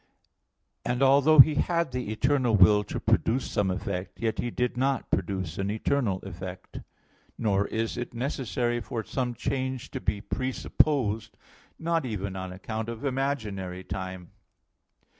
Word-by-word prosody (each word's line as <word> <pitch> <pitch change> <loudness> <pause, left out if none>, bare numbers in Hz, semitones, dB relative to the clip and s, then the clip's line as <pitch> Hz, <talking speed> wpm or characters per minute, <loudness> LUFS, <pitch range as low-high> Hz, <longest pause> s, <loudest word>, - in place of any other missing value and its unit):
And 125 +2 0
although 140 +3 +5
He 155 +3 +6
had 170 0 +1
the 125 -4 -3
eternal 125 +1 +2
will 105 +2 +6
to - - -4
produce 125 +4 +1
some 100 -2 +1
effect, 95 0 -4
yet 115 -1 -1
He 120 - -1
did 125 +1 -1
not 135 +2 0
produce 95 -3 -1
an 95 +1 -1
eternal 110 -1 0
effect. 95 0 -8 0.6
Nor 100 -2 +1
is 115 0 -2
it 120 - -4
necessary 120 -1 -1
for 115 -3 -4
some 125 +2 -2
change 130 +1 -3
to - - -5
be 105 - -1
presupposed, 130 -1 0 0.4
not 165 -1 0
even 100 -6 -3
on 95 -1 -5
account 110 +4 -5
of 115 +4 -6
imaginary 110 -10 -2
time. 95 -2 -6
115 Hz, 140 wpm, -27 LUFS, 100-130 Hz, 0.6 s, He